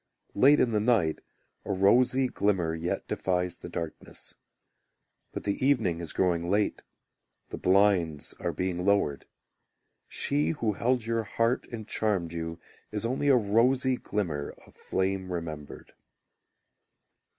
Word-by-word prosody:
Late 140 Hz, +7 st, +5 dB
in 120 Hz, -, +3 dB
the 105 Hz, -, +2 dB
night 105 Hz, -8 st, +2 dB, 0.4 s
A -, -, -4 dB
rosy 125 Hz, +7 st, +4 dB
glimmer 95 Hz, -8 st, 0 dB
yet 80 Hz, +2 st, -3 dB
defies 90 Hz, -1 st, -1 dB
the -, -, -9 dB
darkness. 80 Hz, -2 st, -6 dB, 1.0 s
But -, -, -6 dB
the 100 Hz, +4 st, -2 dB
evening 115 Hz, -12 st, +2 dB
is 85 Hz, -, -5 dB
growing 85 Hz, -2 st, 0 dB
late, 105 Hz, +2 st, +1 dB, 0.7 s
The -, -, -6 dB
blinds 90 Hz, -6 st, +2 dB
are -, -, -1 dB
being 90 Hz, -1 st, -2 dB
lowered; 95 Hz, -9 st, +1 dB, 0.8 s
She 75 Hz, +3 st, +1 dB
who 110 Hz, -2 st, +1 dB
held 125 Hz, +3 st, 0 dB
your 115 Hz, 0 st, 0 dB
heart 115 Hz, +3 st, 0 dB
and 110 Hz, -3 st, -7 dB
charmed 95 Hz, -6 st, -1 dB
you 80 Hz, 0 st, -5 dB, 0.3 s
Is 105 Hz, +1 st, -2 dB
only 130 Hz, +4 st, -1 dB
a 135 Hz, -2 st, +6 dB
rosy 125 Hz, +4 st, +3 dB
glimmer 85 Hz, -12 st, -3 dB
of -, -, -20 dB
flame 95 Hz, 0 st, -2 dB
remembered. 80 Hz, -4 st, -6 dB
100 Hz, 130 wpm, -28 LUFS, 85-115 Hz, 1.0 s, a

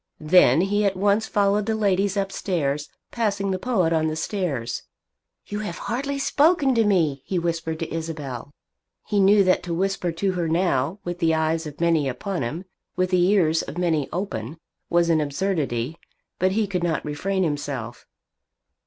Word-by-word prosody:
Then 155 Hz, -2 st, +5 dB
he 205 Hz, +2 st, +1 dB
at 195 Hz, -1 st, +1 dB
once 205 Hz, +3 st, +2 dB
followed 205 Hz, +1 st, +1 dB
the 220 Hz, -, +1 dB
ladies 200 Hz, -1 st, +1 dB
upstairs, 165 Hz, -7 st, -1 dB, 0.2 s
passing 200 Hz, -4 st, -1 dB
the 185 Hz, -, -1 dB
poet 185 Hz, -8 st, +1 dB
on 160 Hz, -1 st, +2 dB
the 155 Hz, -, -2 dB
stairs. 155 Hz, -, -2 dB, 0.6 s
"You 205 Hz, -, -4 dB
have 205 Hz, -5 st, -5 dB
hardly 275 Hz, +4 st, -3 dB
spoken 285 Hz, 0 st, +3 dB
to 230 Hz, -2 st, +3 dB
me," 165 Hz, -10 st, +2 dB
he 185 Hz, -, -2 dB
whispered 165 Hz, -1 st, -2 dB
to 165 Hz, 0 st, -5 dB
Isabel. 150 Hz, -6 st, -5 dB, 0.6 s
He 205 Hz, -, 0 dB
knew 200 Hz, +1 st, +6 dB
that 185 Hz, -1 st, +3 dB
to 170 Hz, -1 st, -4 dB
whisper 190 Hz, -1 st, -1 dB
to 190 Hz, +4 st, -1 dB
her 175 Hz, -2 st, -1 dB
now, 165 Hz, -1 st, +1 dB
with 175 Hz, 0 st, -5 dB
the 160 Hz, -2 st, +2 dB
eyes 160 Hz, 0 st, 0 dB
of 150 Hz, -1 st, -10 dB
many 165 Hz, -4 st, +2 dB
upon 175 Hz, +9 st, -3 dB
him, 160 Hz, +11 st, -4 dB, 0.3 s
with 185 Hz, 0 st, 0 dB
the 180 Hz, -1 st, +4 dB
ears 165 Hz, -5 st, +3 dB
of -, -, -8 dB
many 165 Hz, -5 st, 0 dB
open, 160 Hz, -, -4 dB, 0.3 s
was 170 Hz, 0 st, +3 dB
an 160 Hz, -1 st, +3 dB
absurdity; 145 Hz, -3 st, -2 dB, 0.4 s
but 185 Hz, +1 st, +2 dB
he 220 Hz, +1 st, +1 dB
could 185 Hz, -3 st, -2 dB
not 165 Hz, -3 st, -1 dB
refrain 190 Hz, +6 st, -1 dB
himself. 145 Hz, -7 st, -4 dB
175 Hz, 170 wpm, -24 LUFS, 155-200 Hz, 0.6 s, knew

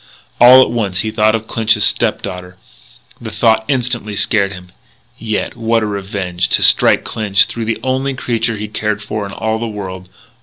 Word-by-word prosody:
All 125 Hz, +2 st, +8 dB
at -, -, -3 dB
once 100 Hz, -6 st, -2 dB
he 110 Hz, -, -3 dB
thought 110 Hz, 0 st, +2 dB
of 110 Hz, 0 st, -4 dB
Clinch's 110 Hz, -1 st, +1 dB
step -, -, +1 dB
daughter. 90 Hz, 0 st, -7 dB, 0.6 s
The -, -, -6 dB
thought 110 Hz, -1 st, +1 dB
instantly 120 Hz, -5 st, -2 dB
scared 100 Hz, -1 st, +1 dB
him. 90 Hz, -2 st, -11 dB, 0.5 s
Yet 110 Hz, -2 st, -3 dB
what 115 Hz, -1 st, 0 dB
a -, -, 0 dB
revenge! 95 Hz, -3 st, -3 dB
to -, -, -1 dB
strike -, -, +5 dB
Clinch 105 Hz, -2 st, +1 dB
through 115 Hz, -1 st, -5 dB
the 115 Hz, 0 st, -2 dB
only 130 Hz, +1 st, -1 dB
creature 115 Hz, -2 st, -2 dB
he 105 Hz, +1 st, -5 dB
cared 105 Hz, 0 st, -3 dB
for 105 Hz, 0 st, -4 dB
in -, -, -10 dB
all 110 Hz, +2 st, -3 dB
the 115 Hz, -, -3 dB
world!... 95 Hz, -4 st, -7 dB
110 Hz, 185 wpm, -15 LUFS, 100-115 Hz, 0.6 s, All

